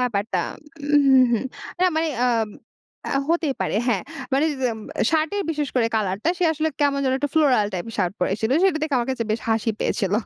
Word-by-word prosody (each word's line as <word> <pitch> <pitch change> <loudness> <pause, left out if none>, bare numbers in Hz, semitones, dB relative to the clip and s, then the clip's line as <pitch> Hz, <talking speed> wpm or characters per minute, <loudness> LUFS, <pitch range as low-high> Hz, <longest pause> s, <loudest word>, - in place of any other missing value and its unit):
ব্যাপারটা 225 -3 0 0.5
উ - - +8
হু, 265 -1 +7
হু। 230 - +3 0.4
না 370 - +5
মানে 325 0 +1 0.2
আম 225 -3 +1 0.6
আ 275 - +1
হতেই 330 -4 +1
পারে - - 0
হ্যাঁ। 205 -7 +1 0.3
মানে 280 +4 +3 0.3
এম 220 - -8 0.3
শার্টের 325 +6 +1
বিশেষ 300 -3 -2
করে 235 -2 +3
কালারটা 205 - 0
সে 360 - +2
আসলে 315 0 0
কেমন 285 -1 +2
যেন 260 - +2
একটা 290 +1 -2
floral 270 -9 +4
টাইপের 205 +5 -5
শার্ট 180 -3 +1
পরে 180 - +1
এসছিল। 220 +2 -2
সেটা 375 -5 +3
দেখে 305 -4 +1
আমার 240 +1 -2
কাছে 240 -3 -3
বেশ 220 - -2
হাসি 225 +1 +1
পেয়েছিল। 195 -4 0
250 Hz, 200 wpm, -23 LUFS, 220-305 Hz, 0.6 s, উ